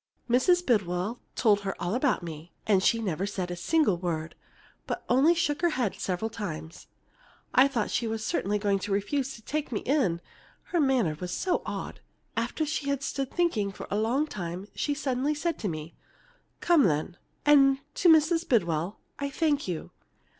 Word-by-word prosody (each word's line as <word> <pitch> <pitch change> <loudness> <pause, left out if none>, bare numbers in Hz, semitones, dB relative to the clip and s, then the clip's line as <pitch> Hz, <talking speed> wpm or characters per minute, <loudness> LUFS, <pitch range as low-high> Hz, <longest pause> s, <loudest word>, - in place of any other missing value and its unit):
Mrs. 355 +9 +3
Bidwell 205 -1 0 0.2
told 210 -4 +4
her 195 -1 -4
all 175 +3 -2
about 255 -5 +1
me, 165 0 -8
and 200 -3 +4
she 230 +4 +3
never 195 -3 -2
said 185 -3 -3
a - - -3
single 210 - +2
word, 165 -2 -3 0.5
but - - -3
only 285 +7 +5
shook 295 -2 0
her 345 - +4
head 250 - 0
several 195 +4 -3
times. 165 -8 -6 0.7
I 260 +2 +7
thought 245 -6 -2
she 235 - 0
was 220 0 -3
certainly 210 - 0
going 200 -1 +1
to 205 - -5
refuse 260 +7 -1
to 225 - -14
take 300 +3 -3
me 215 - -1
in, 255 - +1 0.5
her 345 - +1
manner 260 - +2
was 180 0 -4
so 365 - 0
odd. - - -5 0.4
After 235 +7 -1
she 295 -2 -2
had 280 -1 -1
stood 275 -1 -2
thinking 220 - 0 0.2
a - - +1
long 235 +8 +1
time 185 - -6
she 290 - -1
suddenly 280 +1 0
said 335 +3 -2
to 210 - -2
me, 155 -1 -5 0.7
'Come, 335 -6 +5
then!' 155 0 0 0.3
and 275 -2 +6 0.2
to 350 - +3
Mrs. 325 +1 +4
Bidwell, 175 - +1 0.2
'I 280 0 -2
thank 290 -2 0
you!' 175 -4 -4
230 Hz, 175 wpm, -28 LUFS, 185-285 Hz, 0.7 s, I